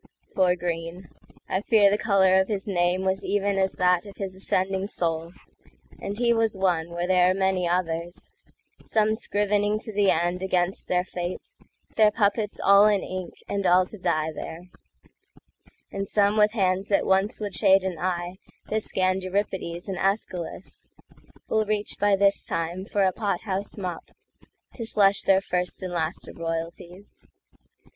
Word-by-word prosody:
…Poor 180 Hz, -2 st, +3 dB
Greene! 170 Hz, 0 st, -5 dB, 0.4 s
I 190 Hz, -, -1 dB
fear 205 Hz, -3 st, +4 dB
the 205 Hz, -, +2 dB
color 190 Hz, -3 st, +4 dB
of 190 Hz, -, -2 dB
his 200 Hz, -3 st, -3 dB
nameWas 190 Hz, +1 st, 0 dB
even 200 Hz, 0 st, 0 dB
as 190 Hz, 0 st, +1 dB
that 180 Hz, +1 st, +2 dB
of 200 Hz, -, -12 dB
his 195 Hz, -2 st, -4 dB
ascending 190 Hz, 0 st, -1 dB
soul; 165 Hz, -3 st, -2 dB, 0.7 s
And 200 Hz, +1 st, -5 dB
he 235 Hz, 0 st, +3 dB
was 225 Hz, -3 st, 0 dB
one 175 Hz, -4 st, 0 dB
where 175 Hz, +1 st, -3 dB
there 180 Hz, 0 st, +4 dB
are -, -, +3 dB
many 190 Hz, -2 st, +1 dB
others,—Some 175 Hz, +5 st, -3 dB
scrivening 205 Hz, -1 st, 0 dB
to 220 Hz, -, -6 dB
the 200 Hz, -1 st, +3 dB
end 175 Hz, +2 st, +1 dB
against 185 Hz, -1 st, -1 dB
their 180 Hz, 0 st, +1 dB
fate, 180 Hz, -, -6 dB, 0.4 s
Their 215 Hz, -1 st, +6 dB
puppets 210 Hz, 0 st, 0 dB
all 200 Hz, +1 st, +6 dB
in 205 Hz, -2 st, +2 dB
ink 185 Hz, -1 st, -6 dB
and 200 Hz, -2 st, -1 dB
all 180 Hz, +1 st, +5 dB
to 215 Hz, -, -11 dB
die 155 Hz, -2 st, 0 dB
there; 170 Hz, +4 st, -8 dB, 1.2 s
And 195 Hz, 0 st, -4 dB
some 205 Hz, 0 st, +2 dB
with 210 Hz, 0 st, +4 dB
hands 190 Hz, -2 st, 0 dB
that 200 Hz, -, +2 dB
once 195 Hz, +2 st, +1 dB
would 205 Hz, -2 st, -4 dB
shade 195 Hz, -2 st, +4 dB
an 185 Hz, -3 st, -3 dB
eyeThat 180 Hz, +5 st, -4 dB
scanned 185 Hz, -2 st, 0 dB
Euripides 185 Hz, -2 st, -3 dB
and 190 Hz, -2 st, -4 dB
ÆschylusWill 195 Hz, +2 st, -4 dB
reach 210 Hz, -1 st, -2 dB
by 205 Hz, 0 st, +4 dB
this 200 Hz, 0 st, +3 dB
time 170 Hz, +3 st, -3 dB
for 200 Hz, -1 st, 0 dB
a 190 Hz, -, +3 dB
pot 205 Hz, -1 st, -2 dB
house 200 Hz, -1 st, -4 dB
mopTo 180 Hz, -4 st, -5 dB, 0.8 s
slush 200 Hz, -3 st, +3 dB
their 195 Hz, 0 st, +3 dB
first 180 Hz, 0 st, -3 dB
and 180 Hz, -1 st, -4 dB
last 165 Hz, -1 st, -2 dB
of -, -, -11 dB
royalties. 170 Hz, +3 st, -6 dB
190 Hz, 155 wpm, -25 LUFS, 180-205 Hz, 1.2 s, Their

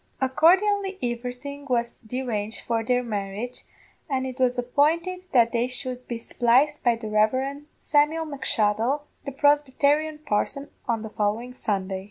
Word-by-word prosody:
Accordianly 380 Hz, +9 st, +3 dB
everything 250 Hz, +4 st, -4 dB
was 235 Hz, -1 st, 0 dB
deranged 225 Hz, -3 st, -4 dB
for 230 Hz, -1 st, -1 dB
their 250 Hz, +2 st, +1 dB
marriage, 210 Hz, +2 st, -4 dB, 0.4 s
and 265 Hz, -2 st, 0 dB
it 260 Hz, 0 st, -6 dB
was 250 Hz, -1 st, +2 dB
appointed 325 Hz, +9 st, +1 dB
that 235 Hz, -3 st, +4 dB
they 235 Hz, +1 st, +1 dB
should 255 Hz, -1 st, -5 dB
be 240 Hz, -, -3 dB
spliced 250 Hz, +6 st, +2 dB
by 240 Hz, -2 st, +3 dB
the 225 Hz, -1 st, -7 dB
Rev. 260 Hz, +7 st, +1 dB
Samuel 310 Hz, +2 st, +2 dB
M'Shuttle, 255 Hz, -1 st, 0 dB, 0.2 s
the 280 Hz, -, -3 dB
Prosbytarian 295 Hz, +2 st, +2 dB
parson, 275 Hz, +6 st, -1 dB, 0.2 s
on 230 Hz, -2 st, 0 dB
the 220 Hz, -, -6 dB
following 220 Hz, +4 st, -1 dB
Sunday. 195 Hz, -5 st, -2 dB
250 Hz, 140 wpm, -25 LUFS, 230-290 Hz, 0.4 s, that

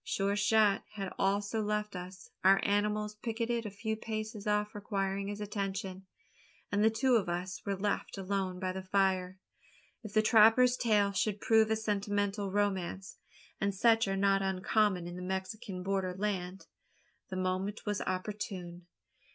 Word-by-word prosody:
Sure 200 Hz, 0 st, 0 dB
shot 210 Hz, -1 st, +3 dB
had 195 Hz, -3 st, -5 dB
also 205 Hz, +3 st, +1 dB
left 210 Hz, -1 st, -2 dB
us 180 Hz, +1 st, -9 dB
our 195 Hz, +1 st, +6 dB
animals 210 Hz, +1 st, +1 dB
picketed 230 Hz, 0 st, -2 dB
a -, -, -4 dB
few 220 Hz, +2 st, -3 dB
paces 215 Hz, -1 st, -5 dB
off 210 Hz, 0 st, +1 dB
requiring 195 Hz, -1 st, -2 dB
his 205 Hz, 0 st, -5 dB
attention 195 Hz, -2 st, -4 dB, 0.6 s
and 205 Hz, +1 st, +2 dB
the 220 Hz, -, +6 dB
two 245 Hz, +2 st, +3 dB
of 195 Hz, -5 st, -1 dB
us 180 Hz, +2 st, -3 dB
were 200 Hz, -, 0 dB
left 205 Hz, +1 st, -2 dB
alone 190 Hz, -1 st, -2 dB
by 185 Hz, -1 st, -1 dB
the 190 Hz, +1 st, -5 dB
fire. 190 Hz, -1 st, +1 dB, 0.6 s
If 215 Hz, -3 st, -9 dB
the 215 Hz, -, +4 dB
trapper's 225 Hz, +3 st, +6 dB
tale 210 Hz, -5 st, +2 dB
should 205 Hz, +1 st, 0 dB
prove 220 Hz, 0 st, +4 dB
a 220 Hz, -, +3 dB
sentimental 205 Hz, -1 st, -1 dB
romance 195 Hz, -2 st, -2 dB, 0.4 s
and 200 Hz, -1 st, 0 dB
such 225 Hz, +1 st, +4 dB
are 195 Hz, 0 st, -1 dB
not 195 Hz, 0 st, +3 dB
uncommon 190 Hz, 0 st, +1 dB
in 175 Hz, +1 st, -6 dB
the -, -, -6 dB
Mexican 190 Hz, +1 st, -4 dB
border 190 Hz, -1 st, -1 dB
land 190 Hz, -2 st, -3 dB, 0.6 s
the 185 Hz, -, -5 dB
moment 185 Hz, +3 st, -2 dB
was 210 Hz, -1 st, -1 dB
opportune. 185 Hz, -2 st, -4 dB
200 Hz, 155 wpm, -32 LUFS, 190-210 Hz, 0.6 s, our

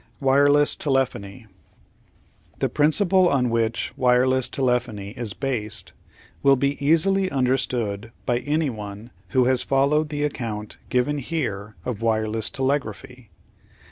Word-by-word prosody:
Wireless 145 Hz, +2 st, +3 dB
Telephony 130 Hz, -5 st, -2 dB, 1.1 s
The -, -, 0 dB
principle 175 Hz, +5 st, +4 dB
on 125 Hz, -3 st, +1 dB
which 115 Hz, 0 st, -1 dB
wireless 130 Hz, +1 st, +2 dB
telephony 120 Hz, -6 st, -1 dB
is 115 Hz, -4 st, -4 dB
based 120 Hz, -6 st, -3 dB, 0.5 s
will 140 Hz, 0 st, +5 dB
be 140 Hz, +2 st, -1 dB
easily 185 Hz, +6 st, +3 dB
understood 125 Hz, -, -1 dB
by 120 Hz, -1 st, +1 dB
anyone 120 Hz, -7 st, -3 dB, 0.2 s
who 130 Hz, -2 st, +2 dB
has 130 Hz, 0 st, +3 dB
followed 145 Hz, +3 st, +1 dB
the 145 Hz, -1 st, -2 dB
account 115 Hz, -7 st, -4 dB
given 130 Hz, +4 st, 0 dB
here 110 Hz, -9 st, -4 dB
of 120 Hz, -4 st, -4 dB
wireless 110 Hz, -1 st, +1 dB
telegraphy. 130 Hz, -3 st, -3 dB
130 Hz, 110 wpm, -23 LUFS, 115-145 Hz, 1.1 s, will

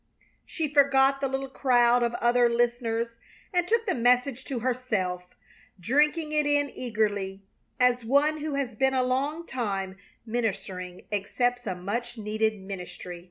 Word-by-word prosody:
She 320 Hz, -2 st, -2 dB
forgot 275 Hz, -1 st, +4 dB
the 275 Hz, -, +1 dB
little 270 Hz, +1 st, -3 dB
crowd 245 Hz, -2 st, +3 dB
of 235 Hz, 0 st, 0 dB
other 240 Hz, 0 st, +3 dB
listeners 235 Hz, -1 st, 0 dB, 0.4 s
and 355 Hz, -1 st, +1 dB
took 455 Hz, +2 st, +2 dB
the 380 Hz, -, +1 dB
message 250 Hz, +2 st, +2 dB
to 255 Hz, -4 st, -4 dB
herself, 220 Hz, -8 st, -1 dB, 0.6 s
drinking 300 Hz, -, +2 dB
it 300 Hz, -1 st, +1 dB
in 290 Hz, -1 st, +2 dB
eagerly 205 Hz, -5 st, -2 dB, 0.4 s
as 250 Hz, -1 st, +3 dB
one 285 Hz, +6 st, +2 dB
who 300 Hz, -1 st, -3 dB
has 270 Hz, -3 st, -2 dB
been 265 Hz, +4 st, +1 dB
a 255 Hz, -, +3 dB
long 280 Hz, +6 st, -1 dB
time 195 Hz, -, -3 dB, 0.3 s
ministering 195 Hz, -6 st, -3 dB
accepts 245 Hz, +4 st, -1 dB
a 185 Hz, -, -1 dB
much 235 Hz, +7 st, -4 dB
needed 215 Hz, 0 st, -1 dB
ministry. 180 Hz, -2 st, -7 dB
245 Hz, 145 wpm, -27 LUFS, 215-270 Hz, 0.6 s, forgot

